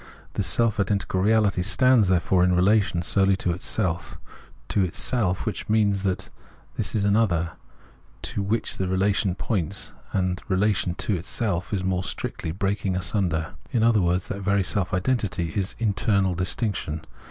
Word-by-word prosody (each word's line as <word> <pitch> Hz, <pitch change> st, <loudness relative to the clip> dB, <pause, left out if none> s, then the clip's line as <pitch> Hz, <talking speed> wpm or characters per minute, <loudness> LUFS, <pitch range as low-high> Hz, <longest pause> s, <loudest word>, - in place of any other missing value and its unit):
This -, -, -1 dB
self 110 Hz, +5 st, +2 dB
identical 100 Hz, -1 st, 0 dB
reahty 105 Hz, -3 st, +3 dB
stands, 125 Hz, +1 st, +4 dB
therefore, 90 Hz, 0 st, +2 dB
in 90 Hz, 0 st, +3 dB
relation 95 Hz, -1 st, +2 dB
solely 95 Hz, +2 st, +3 dB
to 90 Hz, -2 st, -1 dB
itself. 90 Hz, 0 st, -2 dB, 0.5 s
To 100 Hz, -, +2 dB
itself; 95 Hz, +1 st, 0 dB
which 110 Hz, -, -4 dB
means 105 Hz, -3 st, +2 dB
this 95 Hz, +2 st, -5 dB
is 105 Hz, -, +1 dB
an 100 Hz, 0 st, +3 dB
other, 85 Hz, -7 st, +1 dB, 0.7 s
to -, -, -2 dB
which 105 Hz, +3 st, -1 dB
the 95 Hz, -, -1 dB
relation 95 Hz, 0 st, +1 dB
points; 100 Hz, -2 st, -3 dB, 0.2 s
and 90 Hz, -1 st, -1 dB
relation 95 Hz, -2 st, +1 dB
to 105 Hz, -, 0 dB
itself 90 Hz, 0 st, -2 dB
is, 100 Hz, -3 st, -1 dB
more 95 Hz, -1 st, 0 dB
strictly, 80 Hz, -, -4 dB
breaking 95 Hz, +2 st, -1 dB
asunder; 90 Hz, -4 st, -1 dB, 0.2 s
in 120 Hz, -5 st, +1 dB
other 115 Hz, -3 st, +4 dB
words, 90 Hz, +1 st, 0 dB
that 100 Hz, -, -4 dB
very 100 Hz, 0 st, +2 dB
self 90 Hz, +1 st, -1 dB
identity 90 Hz, -5 st, -1 dB
is 95 Hz, -1 st, -1 dB
internal 100 Hz, -3 st, +1 dB
distinction. 90 Hz, -4 st, -2 dB
95 Hz, 150 wpm, -25 LUFS, 90-105 Hz, 0.7 s, stands